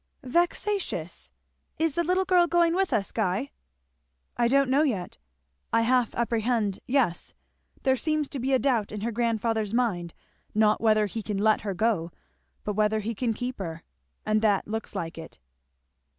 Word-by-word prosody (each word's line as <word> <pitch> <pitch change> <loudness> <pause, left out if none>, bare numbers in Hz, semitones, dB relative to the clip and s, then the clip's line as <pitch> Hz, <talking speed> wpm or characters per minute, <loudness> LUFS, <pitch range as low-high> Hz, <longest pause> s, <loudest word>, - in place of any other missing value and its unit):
"Vexatious! 350 +8 -1 0.5
Is 320 -1 +1
the 340 - 0
little 365 +3 +1
girl 360 -2 +4
going 340 -1 +3
with 385 +1 +1
us, 200 -2 0
Guy?" 200 +10 -1 0.8
"I 235 - +2
don't 275 +1 +3
know 280 +3 +4
yet 225 - -2 0.5
I 230 - +3
half 245 0 +2
apprehend, 230 -3 0
yes; 245 -10 0 0.5
there 265 -1 +3
seems 305 +2 -1
to 280 - -5
be 260 +3 -1
a 265 - +5
doubt 245 -6 +1
in 210 -1 -5
her 235 +2 -1
grandfather's 225 -2 0
mind, 180 -9 -1 0.4
not 215 0 +3
whether 215 -1 +4
he 220 +3 -4
can 210 -1 -3
let 215 +2 +3
her 200 -2 -3
go, 185 -4 +1 0.5
but 210 - -2
whether 215 +1 +1
he 225 +3 -3
can 230 +1 -1
keep 245 +1 -4
her, 165 -3 -5 0.4
and 215 0 +2
that 205 -3 +2
looks 220 +1 -5
like 165 0 -4
it." 160 - -10
230 Hz, 165 wpm, -27 LUFS, 210-270 Hz, 0.8 s, a